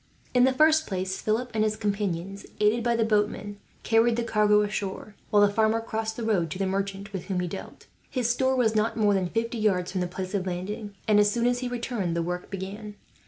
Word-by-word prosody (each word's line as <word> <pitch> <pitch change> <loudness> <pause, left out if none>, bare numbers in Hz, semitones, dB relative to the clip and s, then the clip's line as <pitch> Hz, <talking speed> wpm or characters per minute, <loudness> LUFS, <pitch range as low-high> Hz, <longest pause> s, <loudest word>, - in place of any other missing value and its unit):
In 250 0 +5
the 265 - +4
first 315 +3 +4
place 190 -1 -3
Philip 230 +4 -1
and 215 -1 +1
his 215 0 +1
companions, 200 -2 -3
aided 215 +3 +3
by 235 0 +2
the 225 -1 +2
boatmen, 210 -1 0 0.3
carried 225 +1 +3
the 235 - -1
cargo 210 -2 +3
ashore; 205 0 -4 0.2
while 205 -1 +5
the 205 - 0
farmer 220 +1 +2
crossed 220 -1 -4
the 235 - -4
road 195 -7 +1
to 155 - -5
the 195 - 0
merchant 195 +1 -3
with 190 - -4
whom 190 -2 -2
he 180 - -1
dealt. 190 +3 -8 0.2
His 250 -4 -1
store 260 +2 +2
was 235 -4 +2
not 220 +2 +1
more 210 -2 +3
than 185 -2 0
fifty 230 +2 -2
yards 185 -4 +1
from 185 - -2
the 180 - 0
place 185 +2 -6
of 190 -2 -1
landing 200 +3 -5
and, 210 -1 +5
as 205 0 +5
soon 235 +2 0
as 245 0 +2
he 250 - -3
returned, 235 -8 -2
the 170 - 0
work 180 +1 -4
began. 200 +2 -6
210 Hz, 230 wpm, -26 LUFS, 195-225 Hz, 0.3 s, In